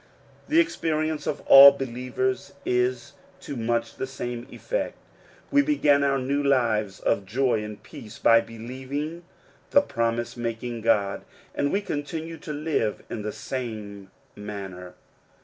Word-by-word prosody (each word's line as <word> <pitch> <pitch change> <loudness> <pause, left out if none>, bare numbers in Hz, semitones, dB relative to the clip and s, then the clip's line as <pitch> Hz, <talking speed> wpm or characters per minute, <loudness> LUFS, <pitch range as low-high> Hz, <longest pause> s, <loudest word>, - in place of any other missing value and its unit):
The 315 +2 +4
experience 155 - 0
of 145 - -2
all 140 +1 +10
believers 130 +1 -3
is 125 0 0 0.3
to 140 - -6
much 115 0 -1
the 130 - -3
same 120 -2 -5
effect: - - -3 0.5
we 285 0 +5
began 150 - +3
our 140 -1 +2
new 140 +2 0
lives 115 -8 +1
of 100 - 0
joy 120 +2 0
and 105 -1 -8
peace 110 0 -11
by 115 0 +5
believirg 130 +8 -6 0.5
the 285 - +6
promise 115 - -2
making 120 0 -4
God, 100 -3 +1 0.3
and 145 - 0
we 200 - +1
continue 160 -1 -5
to 160 - -8
live 145 -8 -1
in 110 - -4
the 105 +1 -3
same 105 -6 -6 0.3
manner. 95 -4 -8
125 Hz, 135 wpm, -25 LUFS, 115-145 Hz, 0.5 s, all